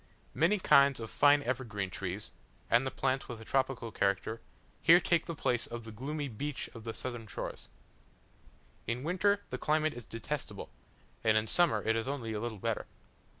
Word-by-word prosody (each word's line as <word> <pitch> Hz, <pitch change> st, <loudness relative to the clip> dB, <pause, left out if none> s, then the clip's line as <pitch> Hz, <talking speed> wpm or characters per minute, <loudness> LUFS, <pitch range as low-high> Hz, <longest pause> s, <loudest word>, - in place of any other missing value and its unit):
Many 170 Hz, +7 st, +3 dB
kinds 140 Hz, -8 st, +5 dB
of 115 Hz, -1 st, -6 dB
fine 145 Hz, 0 st, +5 dB
evergreen 115 Hz, -7 st, -2 dB
trees, 95 Hz, +2 st, -5 dB, 0.4 s
and 130 Hz, +3 st, +3 dB
plants 130 Hz, 0 st, 0 dB
with 120 Hz, -2 st, -6 dB
a 115 Hz, -, -10 dB
tropical 130 Hz, -3 st, 0 dB
character, 100 Hz, +3 st, 0 dB, 0.4 s
here 170 Hz, +1 st, +8 dB
take 170 Hz, -2 st, +1 dB
the 170 Hz, -, -3 dB
place 125 Hz, -4 st, 0 dB
of 120 Hz, 0 st, -6 dB
the 110 Hz, -, -9 dB
gloomy 145 Hz, +6 st, -4 dB
beech 135 Hz, +4 st, -4 dB
of 115 Hz, -1 st, -10 dB
the 115 Hz, -, -3 dB
southern 120 Hz, -3 st, -5 dB
shores. -, -, -6 dB, 1.2 s
In 120 Hz, +3 st, -2 dB
winter 200 Hz, +5 st, +2 dB
the -, -, -3 dB
climate 155 Hz, 0 st, +1 dB
is 120 Hz, -2 st, -9 dB
detestable, 115 Hz, -3 st, -5 dB, 0.5 s
and 110 Hz, -1 st, +4 dB
in 110 Hz, -, +2 dB
summer 115 Hz, -6 st, +3 dB
it 110 Hz, -, +2 dB
is 115 Hz, +2 st, -1 dB
only 125 Hz, -5 st, -3 dB
a 105 Hz, -, -2 dB
little 115 Hz, -1 st, -4 dB
better. -, -, -2 dB
120 Hz, 175 wpm, -32 LUFS, 110-145 Hz, 1.2 s, here